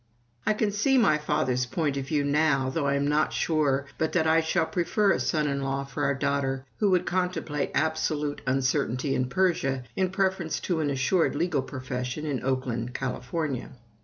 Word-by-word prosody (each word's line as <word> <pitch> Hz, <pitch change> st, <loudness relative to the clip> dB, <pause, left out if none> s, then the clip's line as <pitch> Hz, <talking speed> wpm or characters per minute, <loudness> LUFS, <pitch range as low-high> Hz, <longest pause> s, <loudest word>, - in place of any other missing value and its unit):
I 215 Hz, -, +3 dB
can 210 Hz, -1 st, +1 dB
see 245 Hz, +7 st, +2 dB
my 155 Hz, -11 st, +4 dB
father's 130 Hz, -5 st, 0 dB
point 145 Hz, +2 st, -1 dB
of 135 Hz, -1 st, -3 dB
view 145 Hz, 0 st, +1 dB
now, 140 Hz, -2 st, +2 dB
though 145 Hz, -1 st, -1 dB
I 140 Hz, -, +2 dB
am 140 Hz, 0 st, +1 dB
not 150 Hz, +1 st, +2 dB
sure 145 Hz, -4 st, +1 dB
but 160 Hz, -, 0 dB
that 160 Hz, -3 st, +2 dB
I 160 Hz, +1 st, +4 dB
shall 160 Hz, +1 st, +1 dB
prefer 195 Hz, +4 st, +1 dB
a -, -, +1 dB
son 155 Hz, -3 st, 0 dB
in 140 Hz, -1 st, -1 dB
law 135 Hz, 0 st, -1 dB
for 140 Hz, +2 st, -4 dB
our 140 Hz, 0 st, +1 dB
daughter 135 Hz, -1 st, -1 dB
who 210 Hz, -, +3 dB
would 180 Hz, -1 st, +2 dB
contemplate 180 Hz, -5 st, -1 dB
absolute 155 Hz, -2 st, 0 dB
uncertainty 130 Hz, 0 st, +1 dB
in 125 Hz, 0 st, 0 dB
Persia 135 Hz, -6 st, +1 dB
in 185 Hz, -1 st, +1 dB
preference 190 Hz, -4 st, 0 dB
to 175 Hz, -3 st, -1 dB
an 150 Hz, -2 st, 0 dB
assured 140 Hz, +6 st, +1 dB
legal 160 Hz, -2 st, +1 dB
profession 130 Hz, +1 st, -4 dB
in 140 Hz, -4 st, -2 dB
Oakland, 125 Hz, -2 st, -2 dB
California. 135 Hz, +1 st, -3 dB
145 Hz, 185 wpm, -27 LUFS, 135-165 Hz, -, my